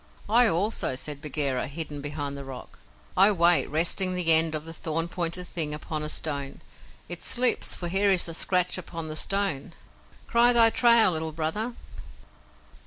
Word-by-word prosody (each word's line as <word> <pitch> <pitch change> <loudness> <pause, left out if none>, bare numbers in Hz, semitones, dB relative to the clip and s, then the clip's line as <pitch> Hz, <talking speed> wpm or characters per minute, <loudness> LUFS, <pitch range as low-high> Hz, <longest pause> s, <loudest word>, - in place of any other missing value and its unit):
"I 235 +3 +4
also," 195 -5 -1
said 145 +2 -6
Bagheera, 140 -4 -1
hidden 150 0 -5
behind 145 -1 -5
the 140 - -8
rock. 135 -2 -11 0.4
"I 195 +3 +5
wait, 175 -2 +3
resting 180 +4 +2
the 170 -2 +6
end 160 0 +4
of 155 0 -6
the 165 - -9
thorn 165 +1 -3
pointed 175 0 -5
thing 150 -3 -1
upon 155 0 -5
a 150 - -4
stone. 140 -3 -4 0.5
It - - -8
slips, 250 0 +2
for 175 - -6
here 195 +3 +1
is 185 -3 +2
a 165 - -7
scratch 180 +2 0
upon 165 -3 -8
the 155 - -6
stone. 180 -3 -1 0.5
Cry 240 +1 +3
thy 230 -1 +5
trail, 235 -5 +4
Little 160 -1 -4
Brother." 190 +10 -3
165 Hz, 170 wpm, -25 LUFS, 150-195 Hz, 0.5 s, the